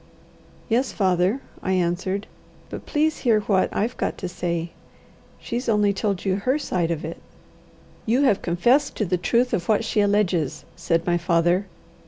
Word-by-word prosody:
"Yes, 245 +3 +1
father," 190 +5 +1 0.2
I 190 - -1
answered. 185 +3 -1 0.5
"But - - -7
please 310 0 +1
hear 225 -4 +3
what 195 -2 +1
I've 230 +4 -1
got - - -2
to 185 - -4
say. 170 -1 -3 0.7
She's 240 +1 -3
only 210 -2 +3
told 200 -1 -2
you 190 -1 +1
her 255 +8 +1
side 180 - -1
of 160 -2 -2
it." 165 - -7 0.9
"You 245 +6 +3
have 210 -8 +3
confessed 240 +12 +2
to 215 - 0
the 180 0 0
truth 240 +7 +1
of 175 +2 -2
what 220 +1 +2
she 215 - +1
alleges," 200 -7 +1
said 165 -1 0
my 175 -1 +1
father. 175 +3 +2
195 Hz, 165 wpm, -23 LUFS, 175-230 Hz, 0.9 s, hear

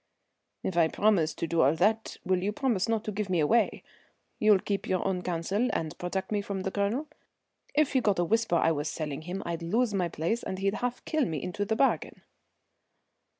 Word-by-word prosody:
"If 185 - -2
I 165 -2 +5
promise 170 -4 +2
to - - -2
do 165 0 +1
all 140 +4 +4
that 215 +6 +1
will 185 -1 +1
you 200 +3 0
promise 230 -4 0
not 225 -1 +1
to 215 - -3
give 205 -1 -3
me 180 -2 +2
away? 220 +10 +2 0.6
You'll 215 -2 +6
keep 200 +1 -3
your 185 0 0
own 185 -2 -1
counsel 185 +7 -1
and 160 -1 -2
protect 190 +2 -3
me 205 -1 +1
from 200 -1 -4
the 190 - -2
Colonel? 205 +9 0 0.7
If 300 -2 +3
he 260 - +3
got 205 -4 +2
a 175 - +2
whisper 225 0 +1
I 165 -1 +3
was 150 -1 -1
selling 150 -2 -4
him 180 +4 -5
I'd 170 0 -3
lose 220 +7 +1
my 180 -3 0
place 170 +10 -1
and 190 - -4
he'd 195 +1 0
half 245 0 -3
kill 310 -4 +1
me 160 -7 -2
into 205 +3 -2
the 220 +2 0
bargain." 270 +4 0
195 Hz, 210 wpm, -29 LUFS, 170-220 Hz, 0.7 s, You'll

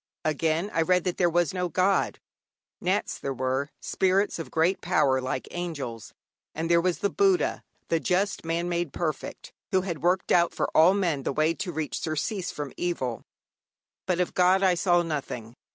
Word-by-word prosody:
Again, 160 +5 0
I 165 - +2
read 180 +1 +3
that 180 -2 -2
there 175 -2 +3
was 175 -2 +1
no 180 -1 -1
God. 185 +4 +1 0.6
Nats - - -1
there 135 -1 -3
were, 130 +3 -1
spirits 190 0 +1
of 165 - -6
great 165 +4 +1
power 150 -7 +2
like 130 0 -3
angels, 145 -11 -5 0.4
and 165 +2 -2
there 170 0 +5
was 180 0 0
the 200 - 0
Buddha 390 -2 +2 0.3
(the 165 - +2
just 195 +4 0
man 165 +1 -1
made 175 -4 -2
perfect), 155 -4 -4 0.2
who 190 - +3
had 170 -4 -4
worked 180 +2 +1
out 170 -1 +3
for - - -2
all 175 +5 +6
men 170 -8 0
the - - -2
way 155 +4 +2
to 195 0 -4
reach 155 -3 -3
surcease 170 +5 -2
from 145 -2 -6
evil; 130 -9 -2 0.9
but 180 -2 +1
of 180 - 0
God 185 +2 +4
I 185 -2 +5
saw 175 0 +3
nothing. 130 -7 -5
170 Hz, 180 wpm, -27 LUFS, 155-180 Hz, 0.9 s, all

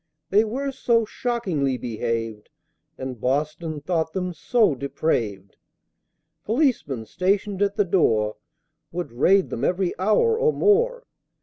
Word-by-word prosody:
They 205 +3 +5
were 265 +6 -3
so 235 -3 +2
shockingly 185 - -1
behaved 115 -2 -3 0.5
And 130 -3 -6
Boston 150 +3 -1
thought 160 0 -1
them 180 -2 -2
so 215 - +2
depraved, 115 -8 -2 0.9
Policemen, 220 - 0
stationed 195 - -1
at 200 0 +1
the 205 - +2
door, 110 - +2 0.5
Would 175 -6 -4
raid 185 +11 +3
them 120 - -4
every 180 +3 +1
hour 330 - +3
or 465 -1 +3
more! 485 +4 +2
180 Hz, 120 wpm, -24 LUFS, 130-220 Hz, 0.9 s, They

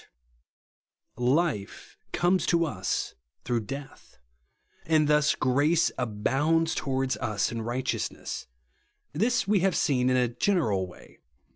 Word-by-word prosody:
12. 125 +3 +2
Life 150 - -2 0.2
comes 180 +2 +1
to 170 -1 +3
us 95 - -2 0.3
througli 115 -3 -1
death; 140 0 -9 0.7
and 155 -2 +3
thus 150 0 +3
grace 145 +6 +2
abounds 140 +8 +1
towards 130 -1 -1
us 105 0 -1
in 115 -1 -4
righteousness. 125 +3 -3 0.7
This 230 +10 +1
we 205 -1 +3
have 185 0 +1
seen 130 -3 +2
in 130 - +3
a 125 -1 +3
general 115 - 0
way. 90 - -16
135 Hz, 120 wpm, -27 LUFS, 120-165 Hz, 0.7 s, to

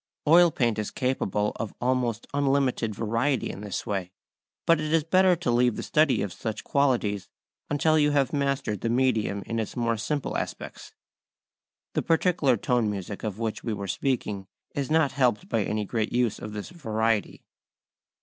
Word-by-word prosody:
Oil 170 +3 +7
paint 120 -7 0
is 105 - -2
capable 105 -5 -1
of 110 - -5
almost 125 -3 0
unlimited 135 -6 +1
variety 115 +4 0
in 100 - -9
this 105 -2 -4
way. 95 -3 -2 0.6
But 165 -2 +4
it 155 0 -2
is 165 -2 +4
better 185 +3 +4
to 165 -8 -1
leave 120 -1 +3
the - - -4
study 145 -8 +2
of 100 - -4
such 110 -2 -5
qualities 120 -9 +1 0.4
until 155 +2 +3
you 150 0 +4
have 140 -2 +1
mastered 140 -7 -1
the 115 - -1
medium 115 -5 +1
in 115 0 -2
its 110 - -4
more 115 -2 0
simple 145 +5 -2
aspects. - - -6 1.0
The - - +1
particular 165 -6 +2
tone 120 0 +1
music 100 0 -5
of 105 -3 -3
which 110 -1 -3
we 115 - -2
were 100 -1 -5
speaking 105 -5 -2 0.3
is 140 -2 -2
not 155 -2 +3
helped 125 -6 +1
by 115 - 0
any 105 +1 -2
great 110 +1 -1
use 120 -3 +1
of 105 - -7
this 105 - -6
variety. 115 - -1
120 Hz, 170 wpm, -26 LUFS, 105-140 Hz, 1.0 s, Oil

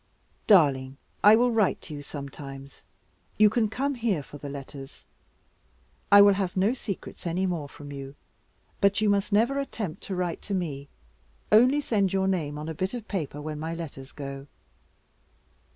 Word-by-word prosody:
"Darling, 140 -9 +4 0.3
I 210 +1 +9
will 245 +2 +3
write 220 -4 +2
to 155 - -9
you 145 - -6
sometimes. 140 -1 -9 0.6
You 210 -1 +6
can 220 -1 +1
come 275 +6 -1
here 225 - -1
for 145 - -12
the 145 - -7
letters. 135 0 -9 1.1
I 200 0 +10
will 200 0 +7
have 190 -2 -2
no 200 +6 +3
secrets 200 -7 -6
any 180 +3 0
more 165 -6 -3
from 145 0 -11
you; 140 0 -8 0.7
but 200 +1 +3
you 215 -1 +3
must 200 +1 0
never 235 +7 +3
attempt 210 - -4
to 195 - -4
write 180 -2 -2
to 200 - -3
me 145 -6 -4 0.6
only 250 +7 +6
send 200 -8 +1
your 190 0 +1
name 155 -6 -1
on 150 +1 -6
a 160 - -3
bit 185 +8 -3
of 230 -3 -7
paper 155 -7 -4
when 150 0 -5
my 160 +2 -4
letters 140 -5 -8
go." 140 -1 -7
180 Hz, 170 wpm, -27 LUFS, 145-210 Hz, 1.1 s, I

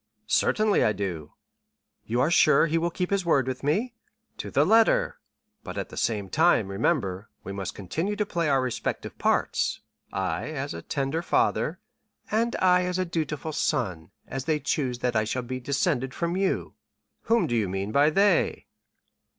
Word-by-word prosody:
"Certainly 215 -1 +2
I 105 - +3
do." 90 -7 -5 0.7
"You 120 +3 +1
are 155 - +2
sure 155 -3 +5
he 165 +1 +1
will 170 +1 0
keep 180 +2 -3
his 200 -1 +1
word 140 -7 +2
with 130 -1 -4
me?" 210 - 0 0.5
"To - - -5
the - - +3
letter, 225 0 +3 0.4
but - - -7
at - - -3
the - - -10
same 105 -4 -1
time, 155 - +3
remember, 95 +1 -1
we 95 - -6
must 100 -1 -5
continue 160 - -3
to 210 0 0
play 170 -5 -1
our 135 -2 +3
respective 125 -2 -3
parts. - - +1 0.3
I, 95 -4 -2
as 145 -2 -4
a 85 - -6
tender 140 - -2
father——" 370 - +1 0.5
"And 230 +2 +1
I 180 -1 +4
as 180 0 -1
a 185 - 0
dutiful 155 -2 -3
son, 95 - -1 0.2
as 135 0 -5
they 155 -1 +1
choose 135 -3 -1
that 120 -1 0
I 110 - +3
shall 125 +4 -2
be 130 +1 -4
descended 135 0 -1
from 170 0 -1
you." 190 0 -1 0.5
"Whom 230 0 +3
do 120 - -1
you 105 -5 +1
mean 95 +2 -3
by 145 +5 +4
they?" 200 +5 +2
140 Hz, 175 wpm, -26 LUFS, 110-175 Hz, 0.7 s, sure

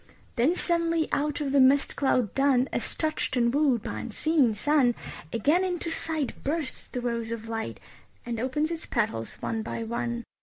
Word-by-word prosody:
Then 265 +9 +3
suddenly 335 -2 +1
out 295 +2 0
of 280 -2 -1
the 280 - +4
mist 270 +2 +4
cloud 255 -6 +1
dun, 270 -2 +3
As - - -2
touched 310 -4 -1
and 235 0 +3
wooed 275 -6 +3
by - - -4
unseen 260 0 +1
sun, 260 +1 +3 0.4
Again 295 - +3
into 350 -2 -2
sight 315 -3 -3
bursts 295 -1 -3
the 250 - -4
rose 235 -2 -2
of 230 -1 -5
light 225 -1 -4 0.5
And 235 -1 -3
opens 295 +6 0
its 330 -1 -5
petals 215 - -1
one 225 -1 -1
by 225 +1 -4
one. 235 +1 -2
265 Hz, 175 wpm, -27 LUFS, 235-310 Hz, 0.5 s, the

